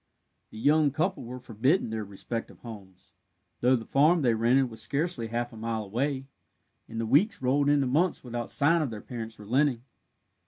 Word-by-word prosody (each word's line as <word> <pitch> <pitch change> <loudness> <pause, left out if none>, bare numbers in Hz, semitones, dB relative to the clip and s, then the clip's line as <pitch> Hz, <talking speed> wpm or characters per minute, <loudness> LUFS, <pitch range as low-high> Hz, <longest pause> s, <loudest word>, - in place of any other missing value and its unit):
The - - -12
young 150 +5 +4
couple 160 +2 -2
were 125 +2 -7
forbidden 125 - 0
their 110 -1 -3
respective 105 +3 -6
homes, 100 -6 -12 0.5
though 125 +2 +4
the 115 -2 -4
farm 155 +4 +3
they 120 -3 +3
rented 120 +4 +3
was 110 - -4
scarce 150 +9 0
half 115 +1 -3
a - - -10
mile 110 0 -3
away, 130 +6 -2 0.6
and 115 - -5
the 115 - -1
weeks 180 - +3
rolled 140 +3 +2
into 145 -2 +3
months 155 +8 +1
without 120 -2 -4
sign 165 +4 +3
of 150 - -1
their 110 -2 -6
parents 115 -1 -7
relenting. 125 +3 0
125 Hz, 180 wpm, -28 LUFS, 115-145 Hz, 0.6 s, young